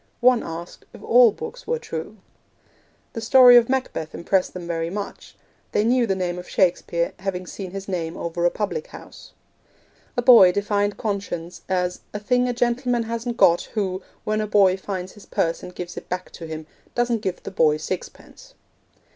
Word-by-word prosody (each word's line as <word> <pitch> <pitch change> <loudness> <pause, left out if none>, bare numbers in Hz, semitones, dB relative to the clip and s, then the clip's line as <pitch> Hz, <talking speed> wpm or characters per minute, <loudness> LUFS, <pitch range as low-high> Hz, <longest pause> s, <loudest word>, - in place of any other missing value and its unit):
One 250 -1 +5
asked 165 +1 -8
if - - -13
all 240 -1 +6
books 465 - -9
were 480 - 0
true. 185 - -6 1.0
The 225 - -5
story 250 +1 +8
of 240 0 +6
Macbeth 255 -12 -2
impressed 185 +2 0
them 180 -1 -6
very 165 -1 -2
much. 200 +2 -7 0.4
They 210 - +2
knew 240 +1 +3
the 195 - +1
name 180 -1 -2
of 180 - -10
Shakespeare, 170 -2 +1
having 185 -1 -3
seen 190 +1 -7
his 195 +1 -7
name 170 -4 -3
over 170 0 -3
a 175 - +5
public 445 - -3
house. - - -13 0.8
A 245 - +1
boy 230 -8 +8
defined 205 0 0
conscience 195 -5 -4
as 180 -1 -1
'a - - -2
thing 250 +4 +1
a - - +1
gentleman 245 0 0
hasn't 230 +1 -4
got, 170 0 +4
who, 190 -3 -1 0.2
when 215 0 0
a 215 - -2
boy 200 -3 +4
finds 190 -1 -5
his 210 - -16
purse 165 0 -1
and 180 - -10
gives 175 -1 -6
it - - -9
back 180 0 -4
to 165 - -9
him, 160 0 -6 0.3
doesn't 240 -2 +1
give 190 -4 -4
the - - -6
boy 155 -5 +3
sixpence.' - - -8
195 Hz, 180 wpm, -23 LUFS, 180-235 Hz, 1.0 s, story